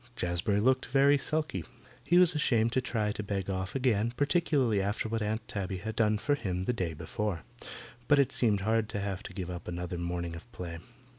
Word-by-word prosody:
Jazbury 90 Hz, +3 st, +1 dB
looked 130 Hz, +4 st, +2 dB
very 140 Hz, +2 st, +5 dB
sulky. 150 Hz, -, -1 dB, 0.4 s
He 175 Hz, +5 st, +3 dB
was 180 Hz, -1 st, +6 dB
ashamed 115 Hz, -6 st, +2 dB
to 130 Hz, -, +1 dB
try 110 Hz, -4 st, -1 dB
to 105 Hz, -, -4 dB
beg 100 Hz, -2 st, -2 dB
off 95 Hz, +3 st, -3 dB
again, 120 Hz, -3 st, +1 dB
particularly 145 Hz, -, +2 dB
after 100 Hz, +3 st, -1 dB
what 115 Hz, 0 st, -2 dB
Aunt 110 Hz, +1 st, -2 dB
Tabby 95 Hz, -2 st, -3 dB
had 110 Hz, +4 st, -5 dB
done 110 Hz, -2 st, +3 dB
for 145 Hz, +7 st, 0 dB
him 95 Hz, -9 st, -2 dB
the 125 Hz, -, 0 dB
day 90 Hz, -7 st, -2 dB
before, 85 Hz, +2 st, -3 dB, 0.6 s
but 145 Hz, -, +5 dB
it 140 Hz, -3 st, +3 dB
seemed 105 Hz, -5 st, +2 dB
hard 110 Hz, +1 st, +1 dB
to 105 Hz, -, -3 dB
have 100 Hz, -2 st, -3 dB
to -, -, -9 dB
give 90 Hz, -1 st, -5 dB
up 90 Hz, -, -7 dB
another 90 Hz, 0 st, -4 dB
morning 85 Hz, -1 st, -3 dB
of 90 Hz, +9 st, -11 dB
play. 85 Hz, -4 st, -6 dB
105 Hz, 205 wpm, -30 LUFS, 95-125 Hz, 0.6 s, was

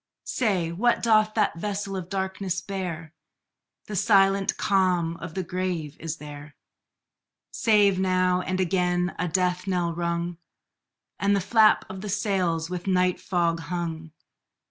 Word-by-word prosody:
Say, 190 Hz, -9 st, 0 dB
what 235 Hz, +8 st, +1 dB
doth 215 Hz, -2 st, +3 dB
that 210 Hz, -6 st, +1 dB
vessel 200 Hz, +1 st, -3 dB
of 185 Hz, -2 st, -5 dB
darkness 190 Hz, -1 st, -2 dB
bear? 175 Hz, -5 st, -5 dB, 0.7 s
The 210 Hz, -, -6 dB
silent 195 Hz, -1 st, +3 dB
calm 180 Hz, -4 st, +1 dB
of 165 Hz, -1 st, -8 dB
the 190 Hz, -, -1 dB
grave 175 Hz, -4 st, -3 dB
is 165 Hz, 0 st, -4 dB
there, 145 Hz, 0 st, -10 dB, 1.0 s
Save 205 Hz, -4 st, +3 dB
now 185 Hz, -1 st, +2 dB
and 185 Hz, 0 st, -2 dB
again 180 Hz, 0 st, +1 dB
a 180 Hz, -, 0 dB
death 180 Hz, +2 st, 0 dB
knell 175 Hz, -3 st, 0 dB
rung, 170 Hz, 0 st, -2 dB, 0.8 s
And 200 Hz, 0 st, +2 dB
the -, -, +2 dB
flap 215 Hz, +3 st, +4 dB
of 190 Hz, 0 st, -8 dB
the 210 Hz, -, -5 dB
sails 185 Hz, -5 st, 0 dB
with 180 Hz, +1 st, -6 dB
night 180 Hz, -1 st, +2 dB
fog 170 Hz, -3 st, 0 dB
hung. 165 Hz, -1 st, -5 dB
185 Hz, 140 wpm, -25 LUFS, 170-195 Hz, 1.0 s, flap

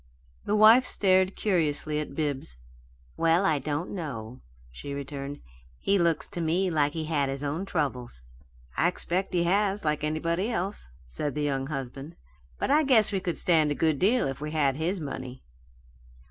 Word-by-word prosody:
The 210 Hz, -, +1 dB
wife 220 Hz, +4 st, +7 dB
stared 190 Hz, -5 st, +2 dB
curiously 155 Hz, -6 st, 0 dB
at 150 Hz, -, -5 dB
Bibbs. 140 Hz, -, -2 dB, 0.6 s
"Well, 165 Hz, +3 st, +3 dB
I 155 Hz, -6 st, +2 dB
don't 150 Hz, +4 st, -3 dB
know," 125 Hz, -, -6 dB, 0.3 s
she 140 Hz, -, -7 dB
returned. 140 Hz, 0 st, -6 dB, 0.4 s
"He 200 Hz, 0 st, +1 dB
looks 170 Hz, -2 st, +1 dB
to 175 Hz, -, -5 dB
me 175 Hz, +3 st, +1 dB
like 145 Hz, -2 st, +1 dB
he 160 Hz, -1 st, -3 dB
had 145 Hz, -3 st, 0 dB
his 135 Hz, +1 st, -4 dB
own 150 Hz, +7 st, -2 dB
troubles." 125 Hz, -, -3 dB, 0.5 s
"I 165 Hz, -, +3 dB
expect 180 Hz, +1 st, -1 dB
he 175 Hz, -2 st, +1 dB
has, 200 Hz, +2 st, +1 dB
like 150 Hz, -1 st, 0 dB
anybody 165 Hz, +6 st, -1 dB
else," 200 Hz, -, -3 dB, 0.2 s
said 130 Hz, -, -4 dB
the 150 Hz, -, -1 dB
young 135 Hz, -2 st, -1 dB
husband, 135 Hz, +2 st, -6 dB, 0.4 s
"but -, -, -1 dB
I 300 Hz, +2 st, +5 dB
guess 245 Hz, -8 st, +4 dB
we 195 Hz, -, 0 dB
could 180 Hz, -3 st, -3 dB
stand 160 Hz, -4 st, +3 dB
a 145 Hz, -, -1 dB
good 155 Hz, -3 st, +1 dB
deal 230 Hz, -, +3 dB
if 135 Hz, +1 st, -5 dB
we 150 Hz, -, -3 dB
had 140 Hz, -4 st, +2 dB
his 170 Hz, +6 st, -1 dB
money." 130 Hz, -4 st, -6 dB
155 Hz, 175 wpm, -27 LUFS, 140-185 Hz, 0.6 s, wife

